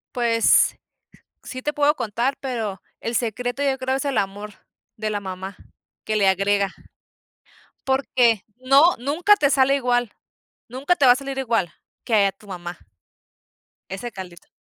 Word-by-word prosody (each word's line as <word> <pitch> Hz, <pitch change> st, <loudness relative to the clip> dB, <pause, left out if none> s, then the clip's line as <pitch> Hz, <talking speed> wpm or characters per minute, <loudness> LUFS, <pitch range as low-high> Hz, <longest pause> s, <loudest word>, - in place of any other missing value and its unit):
Pues, 230 Hz, -2 st, +3 dB, 0.7 s
sí 255 Hz, 0 st, -8 dB
te 295 Hz, -, -1 dB
puedo 295 Hz, +1 st, +2 dB
contar, 235 Hz, +5 st, -1 dB
pero 225 Hz, -8 st, -4 dB, 0.2 s
el 230 Hz, +1 st, -2 dB
secreto, 245 Hz, +3 st, -2 dB
yo 270 Hz, -1 st, +1 dB
creo, 260 Hz, 0 st, -1 dB
es 270 Hz, -, -3 dB
el 280 Hz, -2 st, 0 dB
amor 205 Hz, +1 st, -3 dB, 0.4 s
de 215 Hz, 0 st, -3 dB
la 205 Hz, -, -1 dB
mamá, 190 Hz, 0 st, -7 dB, 0.5 s
que 215 Hz, -, -2 dB
le 200 Hz, -2 st, +3 dB
agrega. 195 Hz, +1 st, +1 dB, 1.1 s
Porque 250 Hz, -5 st, +2 dB
no, 275 Hz, +7 st, +5 dB
nunca 310 Hz, -, +3 dB
te 285 Hz, -, +2 dB
sale 275 Hz, -1 st, +3 dB
igual. 245 Hz, -4 st, 0 dB, 0.6 s
Nunca 270 Hz, +9 st, 0 dB
te 285 Hz, -, +3 dB
va 245 Hz, -, +9 dB
a -, -, +1 dB
salir 275 Hz, 0 st, -6 dB
igual, 230 Hz, -9 st, 0 dB, 0.3 s
que 215 Hz, -4 st, +3 dB
a 195 Hz, -, 0 dB
tu 210 Hz, -, -21 dB
mamá, 175 Hz, -3 st, -7 dB, 1.1 s
ese 195 Hz, +6 st, -6 dB
caldito. 185 Hz, -5 st, -10 dB
240 Hz, 150 wpm, -22 LUFS, 200-270 Hz, 1.1 s, va